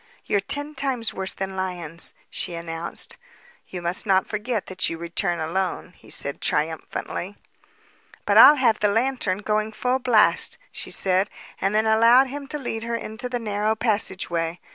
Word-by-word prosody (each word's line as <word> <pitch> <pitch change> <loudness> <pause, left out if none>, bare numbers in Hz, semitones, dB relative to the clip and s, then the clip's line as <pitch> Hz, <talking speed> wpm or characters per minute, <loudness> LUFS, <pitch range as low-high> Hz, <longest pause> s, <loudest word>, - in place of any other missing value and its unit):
"They're 205 - +2
ten 290 +9 +1
times 255 -6 -1
worse 190 0 -4
than 190 0 -4
lions," 175 -3 +1 0.2
she 175 - -4
announced. 170 0 -2 0.5
"You 180 -2 -7
must 175 +5 0
not 190 -1 +3
forget 215 0 -3
that 185 0 -1
you 165 - -5
return 170 +1 -2
alone," 180 +2 -3
he - - -19
said 140 - -4
triumphantly. 160 +5 -3 0.9
"But - - +2
I'll 300 - +10
have 240 -6 +2
the 210 - +3
lantern 220 -3 0
going 215 +1 0
full 250 +3 0
blast," 240 -4 +3
she - - -7
said, 190 +1 +1 0.3
and 195 +2 0
then 215 +1 +3
allowed 230 +4 +6
him 280 +1 -7
to 300 - -4
lead 225 -5 -4
her 235 0 -2
into 230 +2 -4
the 245 - -2
narrow 215 -1 -1
passageway. 190 -6 -1
205 Hz, 165 wpm, -23 LUFS, 180-230 Hz, 0.9 s, I'll